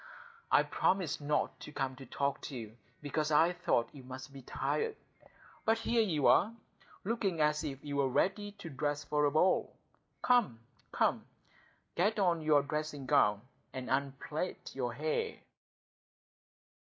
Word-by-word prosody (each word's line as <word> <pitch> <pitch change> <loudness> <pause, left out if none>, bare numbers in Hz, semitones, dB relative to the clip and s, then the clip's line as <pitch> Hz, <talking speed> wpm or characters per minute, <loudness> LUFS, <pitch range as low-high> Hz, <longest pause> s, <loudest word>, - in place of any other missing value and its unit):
"I - - +6
promised 180 -6 0
not 145 +1 0
to - - -9
come 135 -3 -2
and 135 -3 -11
talk 140 0 -1
to 140 - -6
you, 110 -2 -8 0.3
because 150 +1 -1
I 160 +3 +4
thought 120 -9 0
you 140 - -10
must 130 +2 -9
be 135 - -9
tired. 445 - -1 0.7
But 225 +1 +3
here 230 +1 +2
you 160 -10 +1
are, 220 +4 +5 0.5
looking 195 -5 -1
as 150 0 +2
if 135 +1 -5
you 145 -1 -3
were 135 -1 +2
ready 205 +9 0
to 175 - -9
dress 145 +2 -1
for 150 0 +1
a 145 - +3
ball. 180 +5 +2 0.5
Come, 240 - +3 0.3
come, - - +1 0.7
get 205 +5 +1
on 175 -5 +2
your 150 -2 +4
dressing 150 -1 -3
gown 105 -4 +3 0.3
and 130 -2 -5
unplait 140 +5 -2
your - - -2
hair." 465 -1 -2
150 Hz, 150 wpm, -33 LUFS, 135-190 Hz, 0.7 s, I